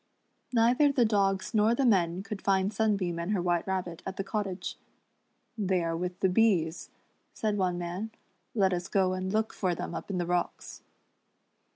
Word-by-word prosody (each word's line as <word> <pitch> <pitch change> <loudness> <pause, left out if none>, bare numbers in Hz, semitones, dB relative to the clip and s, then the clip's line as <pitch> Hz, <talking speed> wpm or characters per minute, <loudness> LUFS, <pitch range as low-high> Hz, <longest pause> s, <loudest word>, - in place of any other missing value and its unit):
Neither 245 +5 +4
the 255 -4 +3
dogs 195 -2 +1
nor 220 +2 +4
the 270 - +1
men 185 -5 +2
could 210 -2 -6
find 195 +1 +1
Sunbeam 200 -6 0
and 170 +5 -1
her 200 - +1
White 175 0 0
Rabbit 180 -3 -3
at 190 - -6
the 195 - -1
cottage. 195 -3 -3 0.8
"They 190 -5 0
are 165 0 -1
with 180 +1 -4
the 190 - +4
bees," 180 -5 +2 0.5
said 215 -2 0
one 185 -3 0
man, 175 +5 -4 0.5
"let 190 -4 +3
us 175 0 -2
go 190 -2 +2
and 185 0 -3
look 220 +1 0
for 180 -3 0
them - - -5
up - - -6
in 195 - -2
the 175 - 0
rooks." 175 0 -2
190 Hz, 180 wpm, -29 LUFS, 180-210 Hz, 0.8 s, Neither